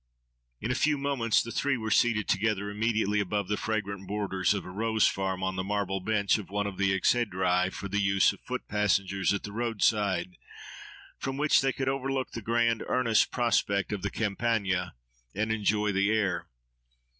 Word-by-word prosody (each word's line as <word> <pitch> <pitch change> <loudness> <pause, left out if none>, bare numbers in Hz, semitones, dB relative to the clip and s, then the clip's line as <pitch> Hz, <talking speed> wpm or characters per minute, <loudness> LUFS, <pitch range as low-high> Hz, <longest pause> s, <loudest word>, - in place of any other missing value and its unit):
In 115 - -2
a - - +2
few 150 +3 +2
moments 135 -5 +1
the 115 - -7
three 140 +1 0
were 110 -2 -4
seated 110 -2 +2
together, 100 -1 0
immediately 105 -1 0
above 100 0 -1
the 105 - +1
fragrant 100 -3 -3
borders 100 -1 0
of 100 - -4
a 90 - -8
rose 110 +2 +1
farm, 95 -1 -1
on 95 0 -2
the 95 - -1
marble 100 -1 -1
bench 100 +1 +1
of 105 - -9
one 105 +1 -1
of 100 -2 -5
the 100 -1 +2
exhedrae 95 -3 +1
for 100 - -6
the 100 +2 -1
use 95 0 +3
of 100 - -15
foot 125 0 -5
passengers 100 -2 +1
at 100 - -1
the 100 - -6
roadside, 100 -5 0 0.8
from 135 0 -3
which 150 +1 +4
they 135 0 +1
could 135 +1 -3
overlook 135 0 -1
the 115 - -6
grand, 115 +1 +1
earnest 115 -4 +2
prospect 105 -5 0
of 100 - -3
the 100 - -2
Campagna, 100 - -1 0.4
and 110 +2 -1
enjoy 105 -1 +1
the 100 +1 +1
air. 100 -5 0
105 Hz, 180 wpm, -28 LUFS, 95-115 Hz, 0.8 s, which